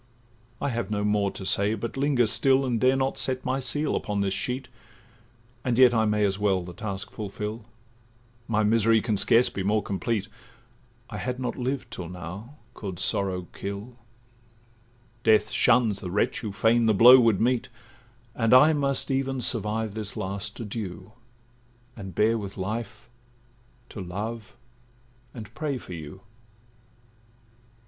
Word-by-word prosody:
'I - - -1
have 115 -5 -3
no 105 -1 -1
more 105 -1 +1
to 95 - -8
say, 100 +3 +2
but 115 +2 -5
linger 135 -3 +2
still, 135 +4 +2
And 120 -3 -1
dare 130 +1 +4
not 135 0 -1
set 130 0 -1
my 130 +1 0
seal 145 +4 -1
upon 105 -2 -2
this 95 -1 0
sheet, 125 +3 -3 1.0
And 120 -2 0
yet 125 -2 +7
I 110 -1 +2
may 105 -1 +2
as 95 0 -1
well 95 -3 +1
the 90 0 -9
task 95 +1 -5
fulfil, 105 +1 -6 0.8
My 110 -1 +1
misery 110 +1 +4
can 110 -2 0
scarce 115 +4 +4
be 100 - -5
more 105 +2 +1
complete: 100 +2 -2 0.8
I - - -5
had 125 0 -3
not 125 - -3
lived 130 +1 -3
till 85 -3 -6
now, 90 +9 -8 0.2
could 95 -4 -6
sorrow 95 -2 0
kill; 100 +5 -6 1.3
Death 110 -1 +4
shuns 115 -4 +3
the 90 - -6
wretch 105 +7 0
who 110 -4 -5
fain 115 +3 +2
the 110 - +3
blow 125 +5 +9
would 115 -5 +3
meet, 120 +1 +1 0.6
And 115 +2 +3
I 150 +5 +7
must 140 -2 0
even 135 0 -1
survive 110 -3 -1
this 110 -1 -6
last 100 0 -4
adieu, 105 -3 -6 0.8
And 95 -5 -9
bear 115 +2 +2
with 100 -1 -7
life, 105 +3 -5 0.8
to 105 - -7
love 105 +6 -6 0.8
and 110 -2 -9
pray 145 0 -3
for 95 - -10
you! 80 +3 -9
110 Hz, 155 wpm, -26 LUFS, 100-125 Hz, 1.3 s, blow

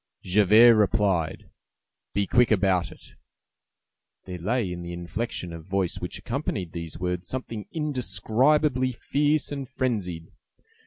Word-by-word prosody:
Javert 105 +5 +6
replied:— 100 -6 +1 0.6
"Be 100 0 +2
quick 125 +3 +3
about 95 -4 +2
it!" - - -14 1.1
There 90 -1 -7
lay 105 +2 -1
in 90 - -6
the 85 0 -6
inflection 85 +1 -4
of 80 -1 -9
voice 95 -1 -1
which 90 - -5
accompanied 115 - -3
these 85 -2 -6
words 90 0 -3
something 115 -5 -5
indescribably 130 -2 +1
fierce 145 +5 0
and 140 -3 -5
frenzied. 95 -12 -3
105 Hz, 120 wpm, -26 LUFS, 90-125 Hz, 1.1 s, Javert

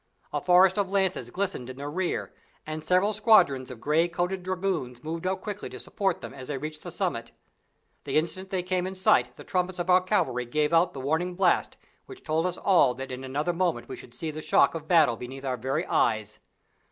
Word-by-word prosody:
A - - -1
forest 185 +2 +5
of 195 -2 0
lances 190 -2 0
glistened 185 -10 -3
in 130 - -8
their 145 +1 -5
rear, 180 +2 -2 0.3
and 155 0 -5
several 185 +4 +2
squadrons 190 - +4
of 125 -3 -9
gray 155 +6 +2
coated 180 +2 -2
dragoons 180 -10 -3
moved 165 +3 -4
up 190 0 -1
quickly 205 -1 -5
to - - -9
support 195 -3 -1
them - - -8
as 130 -2 -9
they 145 - -3
reached 155 +2 -6
the 175 - -7
summit. 165 -11 -3 0.7
The - - 0
instant 185 +4 -1
they 185 -2 -1
came 185 0 -1
in 190 - -6
sight 125 -9 +3
the - - -11
trumpets 185 0 -1
of 175 +1 0
our 180 +1 +6
cavalry 180 - 0
gave 150 +6 0
out 170 +2 +4
the 135 - -5
warning 160 +6 -1
blast 180 -2 +2 0.3
which 390 - -12
told 160 +2 0
us 180 - -3
all 175 -10 +4
that 135 +1 -6
in 130 +1 -6
another 145 +6 -1
moment 170 -9 -1
we - - -6
should 120 - -13
see 155 +4 -3
the 155 +1 -7
shock 140 - +4
of 160 -2 -6
battle 155 -9 +4
beneath 135 +3 -8
our 130 -1 0
very 130 +3 -2
eyes. - - 0
170 Hz, 215 wpm, -27 LUFS, 135-185 Hz, 0.7 s, our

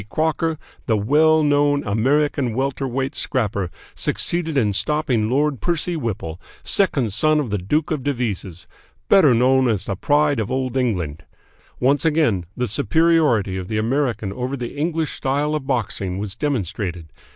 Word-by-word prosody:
Crocker, 160 +3 0 0.3
the 110 - +2
well 155 +8 +4
known 145 -1 +2
American 130 +3 +1
welter 135 +1 -1
weight 135 +3 -2
scrapper, 105 -10 -1 0.2
succeeded 165 -3 -1
in 105 -6 +2
stopping 125 -2 0
Lord 140 +1 +1
Percy 175 0 0
Whipple, 100 - -4 0.2
second 135 - +1
son 155 +7 +3
of 130 -8 -3
the 105 - 0
Duke 150 - -1
of 155 -3 -1
Devizes, 105 - -3 0.4
better 155 -11 +6
known 130 +2 +3
as 105 -4 0
the 100 - -2
Pride 145 +5 +2
of 110 - -2
Old 130 -1 -2
England. 90 - -1 0.6
Once 135 +2 +2
again 150 - +1
the 125 0 0
superiority 145 - +2
of 90 -1 -5
the 110 - -2
American 115 -3 -1
over 130 +4 -3
the 120 -2 -6
English 160 +1 -1
style 145 +3 -1
of 150 -3 -3
boxing 105 -7 -1
was 100 -1 -4
demonstrated. 100 - -3
130 Hz, 150 wpm, -21 LUFS, 105-150 Hz, 0.6 s, better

